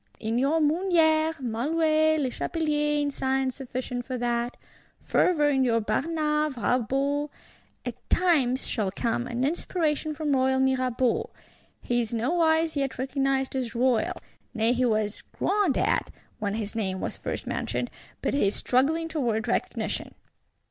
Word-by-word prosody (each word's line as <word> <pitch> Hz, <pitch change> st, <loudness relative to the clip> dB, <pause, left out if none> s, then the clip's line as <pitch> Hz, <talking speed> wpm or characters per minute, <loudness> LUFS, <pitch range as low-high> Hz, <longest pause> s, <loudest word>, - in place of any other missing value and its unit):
In 225 Hz, +1 st, -1 dB
your 285 Hz, +5 st, +2 dB
Mouniers, 320 Hz, 0 st, +3 dB
Malouets, 310 Hz, +6 st, +2 dB
Lechapeliers 295 Hz, +2 st, 0 dB
in 285 Hz, -, -1 dB
science 265 Hz, -1 st, 0 dB
sufficient 250 Hz, -2 st, -4 dB
for 255 Hz, +1 st, -4 dB
that; 240 Hz, 0 st, -1 dB, 0.4 s
fervour 300 Hz, -5 st, +2 dB
in 270 Hz, -2 st, +3 dB
your 230 Hz, -2 st, +3 dB
Barnaves, 300 Hz, +6 st, 0 dB
Rabauts. 270 Hz, +6 st, 0 dB, 0.6 s
At -, -, -7 dB
times 275 Hz, -8 st, +2 dB
shall 210 Hz, -4 st, -1 dB
come 235 Hz, +4 st, -1 dB
an 245 Hz, +1 st, -2 dB
inspiration 310 Hz, 0 st, -1 dB
from 295 Hz, -2 st, 0 dB
royal 265 Hz, 0 st, +2 dB
Mirabeau: 255 Hz, -2 st, +1 dB, 0.5 s
he 240 Hz, 0 st, +1 dB
is 230 Hz, 0 st, -3 dB
nowise 320 Hz, +5 st, +2 dB
yet 275 Hz, -2 st, -1 dB
recognised 270 Hz, +1 st, 0 dB
as 250 Hz, -3 st, -3 dB
royal; 245 Hz, -2 st, +2 dB, 0.4 s
nay 225 Hz, +2 st, +3 dB
he 250 Hz, +1 st, +1 dB
was 215 Hz, -2 st, 0 dB, 0.2 s
"groaned 400 Hz, -8 st, +2 dB
at," -, -, +1 dB, 0.3 s
when 205 Hz, -1 st, -1 dB
his 215 Hz, -2 st, -3 dB
name 190 Hz, -4 st, -2 dB
was -, -, -3 dB
first -, -, -5 dB
mentioned: -, -, -2 dB, 0.3 s
but -, -, 0 dB
he 280 Hz, -8 st, +3 dB
is 200 Hz, -, 0 dB
struggling 310 Hz, +6 st, +1 dB
towards 240 Hz, -9 st, -1 dB
recognition. -, -, -2 dB
265 Hz, 140 wpm, -27 LUFS, 240-305 Hz, 0.6 s, Mouniers